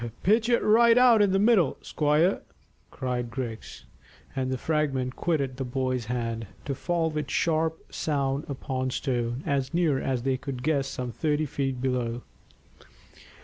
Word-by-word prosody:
"Pitch 220 +4 +3
it 235 - +3
right 230 +2 +5
out 245 -3 +6
in 200 -2 +4
the 195 - +3
middle, 200 - +3
squire," 155 +5 +2 0.5
cried 125 -2 -3
Griggs, 115 -3 -6 0.5
and 130 -1 -1
the 130 - -1
fragment 135 -3 -1
quitted 140 -7 -1
the 135 - -2
boy's 130 -1 -2
hand, 115 -2 -3 0.2
to 140 - -2
fall 165 +3 -1
with 150 -2 -3
a - - -7
sharp 160 0 0
sound 140 -2 -1
upon 130 -1 -3
stone, 125 -1 -2
as 140 +2 -1
near 160 -6 +2
as 130 -3 -2
they 135 0 +1
could 130 -2 -6
guess 140 -2 +1
some 125 -1 -4
thirty 150 +3 0
feet 135 -2 -2
below. 125 -2 -1
135 Hz, 155 wpm, -27 LUFS, 125-160 Hz, 0.5 s, out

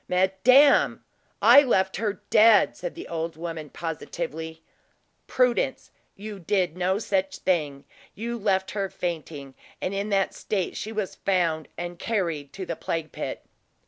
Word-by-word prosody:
"Madame, 190 +10 +4 0.4
I 285 - +9
left 190 -8 +1
her 210 -1 -3
dead!" 220 -1 +6
said - - -6
the 345 - -8
old 165 -1 -4
woman 165 -2 -6
positively. 160 0 -5 0.6
"Prudence, 250 +1 +1 0.2
you 205 0 -8
did 180 -2 0
no 185 +1 +1
such 195 -3 -1
thing; 150 -6 -1 0.3
you 235 +3 -4
left 190 -2 0
her 200 -2 -2
fainting, 155 -7 -5 0.3
and 185 - -3
in 200 +2 -2
that 195 -2 +1
state 195 -4 -3
she 220 - -5
was 210 -3 -3
found 170 -5 0
and 175 0 -6
carried 170 -10 -2
to 190 - -6
the 170 - -4
plague 160 -1 -4
pit." - - -6
190 Hz, 145 wpm, -25 LUFS, 165-210 Hz, 0.6 s, I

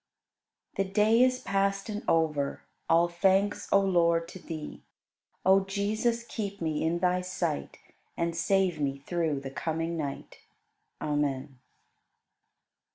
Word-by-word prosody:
24. 195 -1 0
The - - -17
day 220 +2 +5
is 255 0 +4
past 195 +1 0
and 210 -1 -4
over, 150 -4 +1 0.3
All 170 +1 +5
thanks, 195 +4 +1
O 195 - +6
Lord, 170 -3 +2
to 185 - -9
Thee! 155 -3 -7 0.6
O 190 +1 +7
Jesus, 215 +4 -1
keep 205 -4 -5
me 160 -2 -1
in 165 +2 +1
Thy 180 +1 +1
sight 180 -4 -3 0.4
And 170 0 -1
save 180 -1 +1
me 140 -1 0
through 160 -5 -1
the 135 -1 -6
coming 165 +3 -2
night. 145 -3 -5 0.6
Amen. 140 -2 -2
175 Hz, 130 wpm, -29 LUFS, 160-195 Hz, 0.6 s, O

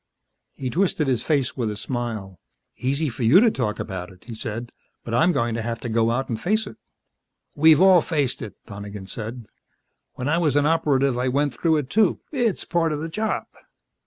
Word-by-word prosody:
He 130 -2 -4
twisted 170 -2 +1
his 125 -4 +1
face 140 -3 0
with 120 -4 -1
a 105 - -5
smile. 110 -5 -4 0.4
"Easy 140 +6 0
for 125 -1 -6
you 120 +11 +7
to 225 +1 +5
talk 110 - -2
about 95 -3 -5
it," 90 - -18
he 120 - -7
said. 115 +2 -5 0.3
"But 115 - -6
I'm 160 +9 +4
going 115 -7 0
to 115 - -2
have 115 0 -3
to 120 - -4
go 115 0 +2
out 125 +3 -1
and 115 -2 -4
face 215 +4 +1
it - - -10 0.4
" - - -56 0.3
"We've 155 +1 +6
all 190 -2 +7
faced 145 -6 -1
it," 105 -5 -7
Donegan 100 -1 -8
said. 115 +4 -6 0.7
"When 125 - -4
I 165 +3 +2
was 155 -5 +1
an 145 0 +3
Operative 140 -5 +2
I 125 - 0
went 140 +1 +1
through 160 +6 +2
it, 140 -2 -3
too. 215 -3 +3
It's 240 -8 0
part 165 -2 +1
of 150 - -2
the 160 +2 -4
job." 215 +6 -1
130 Hz, 210 wpm, -23 LUFS, 115-160 Hz, 0.7 s, you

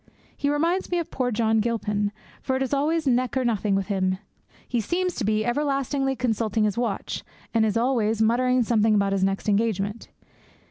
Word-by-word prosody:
He 285 - -1
reminds 335 +6 0
me 355 - 0
of 340 - -3
poor 255 -2 -1
John 220 -1 +2
Gilpin, 210 -2 -1 0.3
for 260 - -1
it 265 - 0
is 265 - -3
always 305 +3 +1
neck 255 0 +1
or 260 - +1
nothing 210 -3 +1
with 195 0 0
him. 185 -2 0 0.5
He 240 -2 0
seems 360 - -1
to 255 - -1
be 215 +1 +1
everlastingly 275 +1 0
consulting 225 -3 0
his 210 -2 +1
watch, 235 -4 -2 0.3
and 225 -1 +3
is 215 - 0
always 230 -3 +1
muttering 250 +3 +3
something 220 -1 +3
about 200 -1 +2
his 195 -1 +1
next 195 +2 -1
engagement. 205 0 0
230 Hz, 185 wpm, -25 LUFS, 210-265 Hz, 0.5 s, and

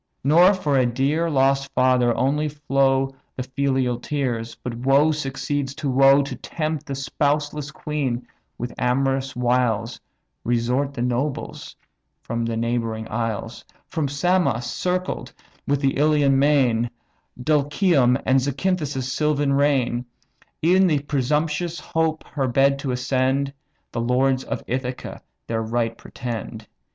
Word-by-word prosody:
Nor 175 +8 +6
for 145 -7 +1
a 130 - +3
dear 140 +7 0
lost 135 -1 +2
father 125 -1 +4
only 150 +3 +1
flow 135 -2 +1 0.2
The 130 - -3
filial 130 -2 0
tears, 120 -5 -2
but 125 - -6
woe 135 +6 +3
succeeds 140 -1 -3
to 145 -3 -2
woe 135 +2 +6
To 140 - -5
tempt 155 -2 -4
the 140 - -3
spouseless 145 +2 -1
queen 140 -6 -3 0.3
with 120 +1 -5
amorous 135 +1 0
wiles 120 -2 0 0.4
Resort 125 +4 0
the 120 - -2
nobles 125 +3 -3 0.5
from 115 0 -2
the 115 -1 -2
neighbouring 115 -1 -2
isles; 115 -2 -3 0.2
From 155 -3 -2
Samos, 145 -4 +1
circled 180 +8 -2 0.3
with 145 0 +1
the 135 -1 +1
Ionian 145 -3 +3
main, 130 -5 +3 0.5
Dulichium, 145 -1 +2
and 130 +1 +4
Zacynthas' 145 0 -1
sylvan 145 +2 0
reign; 135 -4 +2 0.6
Ev'n 185 +3 +5
with 145 -3 0
presumptuous 150 +4 0
hope 160 0 -1
her 135 -3 -2
bed 135 +2 +3
to 135 - -4
ascend, 130 +2 0 0.4
The 115 - -2
lords 130 +2 +2
of - - -4
Ithaca 125 0 -4 0.2
their 115 -1 -2
right 115 0 -1
pretend. 115 -2 -6
135 Hz, 130 wpm, -23 LUFS, 125-145 Hz, 0.6 s, Nor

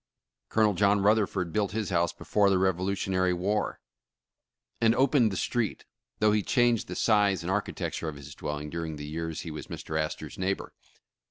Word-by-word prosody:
Colonel 110 -2 +3
John 100 +2 +3
Rutherford 100 -4 +2
built 100 -2 0
his 110 -3 -2
house 85 -1 +2
before 100 +3 +1
the 95 - +3
Revolutionary 95 0 +1
War, 100 +3 -1 1.0
and 115 0 +4
opened 130 -3 +4
the 95 - -3
street, 120 0 -1 0.3
though 105 0 +3
he 105 0 +2
changed 120 +1 +2
the - - -5
size 100 -4 +3
and 90 - -2
ar 105 +2 +2
chitecture 80 - -4
of 75 - -7
his 70 +1 -10
dwelling 75 +1 -5
during 80 -2 -4
the 75 +1 -7
yars 80 -1 -3
he 85 - -6
was 75 - -7
Mr. 80 0 -4
Astor 75 - -4
's - - -12
neighbor. 95 +1 -2
95 Hz, 180 wpm, -28 LUFS, 85-105 Hz, 1.0 s, and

